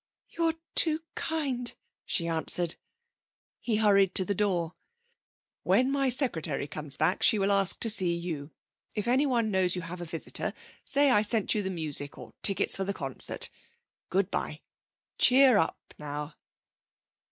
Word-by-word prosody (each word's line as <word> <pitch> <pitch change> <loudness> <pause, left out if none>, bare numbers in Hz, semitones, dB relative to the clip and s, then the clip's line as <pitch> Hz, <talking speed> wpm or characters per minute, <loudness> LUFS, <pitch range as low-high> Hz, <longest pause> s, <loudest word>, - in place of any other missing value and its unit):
'You're 330 -1 -1 0.2
too 315 -1 +3
kind,' 270 -7 -3 0.3
she 170 -3 +1
answered. 165 +1 0 0.8
He 230 - -2
hurried 200 -3 +3
to 185 - +3
the 200 - -1
door. 180 -4 -1 0.9
'When 245 +9 +2
my 275 -1 +1
secretary 170 - +1
comes 145 -1 -2
back 165 +4 0
she 220 - +4
will 200 0 0
ask 195 -1 +2
to - - +2
see 180 -5 +3
you. 165 -4 -6 0.5
If 210 +1 -3
anyone 245 -3 +1
knows 185 -2 +2
you 180 - -5
have 175 +2 -8
a - - -5
visitor 165 -1 -4 0.3
say 285 -1 +6
I 210 - +4
sent 215 -1 +1
you 210 - -1
the 190 - -4
music 150 -5 -4
or - - -12
tickets 195 -3 +4
for 195 - -2
the 200 +1 -4
concert. 135 -2 0 0.6
Good 195 +1 0
bye. - - -4 0.6
Cheer 255 -3 +5
up 165 - -1 0.2
now!' 150 +1 -6
195 Hz, 155 wpm, -28 LUFS, 170-240 Hz, 0.9 s, say